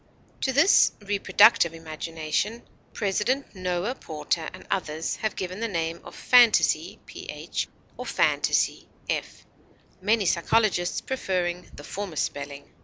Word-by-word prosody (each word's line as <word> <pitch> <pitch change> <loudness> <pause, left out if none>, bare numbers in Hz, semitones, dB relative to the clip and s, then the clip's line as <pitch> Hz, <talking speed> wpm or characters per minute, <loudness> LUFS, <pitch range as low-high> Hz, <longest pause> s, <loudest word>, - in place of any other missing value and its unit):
To 265 - +1
this 290 +9 +5
Reproductive 200 -3 +4
Imagination 165 +6 -3 0.3
President 215 +7 -1
Noah 185 +3 -2
Porter 160 - -3
and - - -12
others 160 -4 -2
have 215 -2 -2
given 185 +1 -4
the 230 - -1
name 165 -4 -3
of - - -11
phantasy 245 -3 +4 1.0
or - - -6
fantasy - - +1 1.1
(many 210 +1 +2
psychologists 175 +1 +1
preferring 180 -8 -2
the 145 - -10
former 195 0 -6
spelling). 140 -1 -4
185 Hz, 110 wpm, -26 LUFS, 165-215 Hz, 1.1 s, this